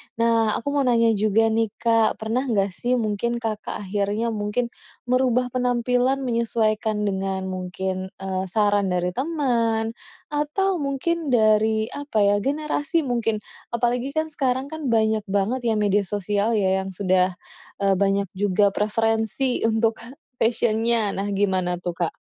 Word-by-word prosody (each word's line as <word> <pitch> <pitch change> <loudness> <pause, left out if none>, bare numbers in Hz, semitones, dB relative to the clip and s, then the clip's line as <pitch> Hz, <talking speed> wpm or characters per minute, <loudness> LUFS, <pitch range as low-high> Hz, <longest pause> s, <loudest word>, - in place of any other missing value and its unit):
Nah 230 -1 +2
aku 260 - -5
mau 285 - +1
nanya 230 -1 +4
juga 215 +1 +2
nih 225 0 +2
Kak, 225 -1 +2
pernah 220 +3 -2
nggak 200 -5 +1
sih 245 +6 -1
mungkin 230 +1 -1
Kakak 220 -3 -4
akhirnya 205 +4 -1
mungkin 215 +3 -2 0.4
merubah 250 -1 +2
penampilan 250 +2 +1
menyesuaikan 220 -3 0
dengan 190 -1 -1
mungkin, 185 +1 -4
eee, 190 -1 -3
saran 205 0 +2
dari 180 0 0
teman 235 - 0 0.4
atau 330 +5 0
mungkin, 295 +4 -1
dari 220 0 +3
apa 285 -8 -1
ya, 200 0 +4
generasi 300 - -1
mungkin, 225 -4 -1 0.3
apalagi 245 +4 -1
kan 315 0 -1
sekarang 265 0 -1
kan 315 -3 -4
banyak 220 -2 +2
banget 200 +6 0
ya 220 - +2
media 205 -2 +1
sosial 205 +3 0
yang 190 -2 0
sudah, 185 -1 +2 0.5
e 195 - +4
banyak 200 -1 +1
juga 205 0 +3
preferensi 225 +4 0
untuk 225 0 +1 0.4
fashion-nya, 225 -1 +1
nah 195 +1 -3
gimana 190 -3 0
tuh, 175 - -1 0.2
Kak? - - -9
220 Hz, 135 wpm, -23 LUFS, 200-245 Hz, 0.5 s, nanya